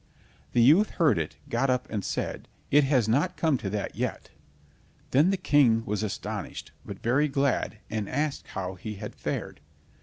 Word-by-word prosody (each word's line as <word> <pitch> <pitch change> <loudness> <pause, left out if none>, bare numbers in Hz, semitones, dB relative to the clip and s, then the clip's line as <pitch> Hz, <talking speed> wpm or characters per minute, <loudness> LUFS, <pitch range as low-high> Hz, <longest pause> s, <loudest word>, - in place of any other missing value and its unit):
The 120 - +5
youth 170 - +6
heard 150 - +4
it, 80 - -4
got 120 +3 0
up, 125 0 0
and 105 -3 -2
said: - - -3 0.2
"It 145 0 +6
has 130 -5 +2
not 150 +10 +1
come 155 -2 +2
to 95 - -3
that 105 0 -3
yet." - - -3 0.8
Then 145 +7 +5
the 195 - +1
King 120 -9 +3
was 105 0 -2
astonished, 110 -1 -5
but - - -9
very 130 +6 +3
glad, 135 -5 0
and 110 -2 -3
asked 145 +1 -2
how 95 -1 -4
he 105 +3 -7
had 105 +1 -7
fared. - - -4
125 Hz, 175 wpm, -27 LUFS, 105-145 Hz, 0.8 s, youth